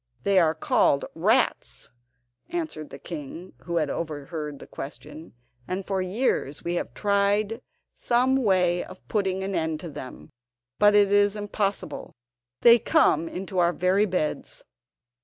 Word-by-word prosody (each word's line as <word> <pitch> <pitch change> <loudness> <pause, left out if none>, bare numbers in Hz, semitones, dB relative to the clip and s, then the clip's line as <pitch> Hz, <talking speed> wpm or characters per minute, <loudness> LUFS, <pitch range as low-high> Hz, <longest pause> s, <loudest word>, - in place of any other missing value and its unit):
"They 195 -1 +4
are 160 -2 +3
called 140 -2 +2
rats," 215 +10 0 0.6
answered 320 - -4
the - - -9
king, 165 +3 -8
who 170 - -3
had 155 -3 0
overheard 150 -1 -5
the - - -11
question, 150 +4 -9 0.3
"and 185 +1 -3
for 195 -1 -1
years 185 - -1
we 170 - -2
have 120 -8 -3
tried 205 +3 +1 0.3
some 255 +2 +2
way 185 -7 +2
of 185 - -13
putting 190 -3 -1
an 195 +1 -3
end 160 -3 -1
to 170 - -7
them, 130 - -10 0.5
but 205 0 +6
it 205 -1 +5
is 205 0 +4
impossible. 205 -1 -3 0.5
They 235 0 +8
come 165 -5 +2
into 190 0 -4
our 175 0 +3
very 190 +4 +2
beds." 180 -5 -3
185 Hz, 140 wpm, -25 LUFS, 160-205 Hz, 0.6 s, They